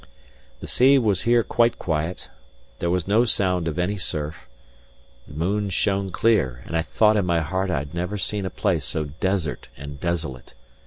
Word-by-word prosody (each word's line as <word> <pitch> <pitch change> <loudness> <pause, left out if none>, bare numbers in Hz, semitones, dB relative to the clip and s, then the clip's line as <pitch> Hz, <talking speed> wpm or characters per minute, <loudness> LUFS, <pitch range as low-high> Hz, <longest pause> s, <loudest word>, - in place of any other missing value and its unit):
The - - -6
sea 135 +3 +5
was 105 -7 +2
here 120 -1 +5
quite 120 +1 +2
quiet; 80 +1 -2 0.5
there 85 - -1
was 90 0 0
no 110 +4 +4
sound 90 -7 +1
of 80 - -3
any 90 +4 0
surf; 75 -7 -3 0.8
the - - -12
moon 100 +6 0
shone 95 +1 0
clear; 80 - +1
and 85 - -5
I 80 - +3
thought 110 +5 +3
in 100 - +1
my 85 -1 +2
heart 95 +5 -1
I 85 - +1
had 70 +2 -5
never 90 +4 -2
seen 105 +1 -1
a - - -3
place - - 0
so 80 - -1
desert 90 +2 -2
and 70 0 -8
desolate. 80 -8 -4
90 Hz, 180 wpm, -24 LUFS, 80-105 Hz, 0.8 s, sea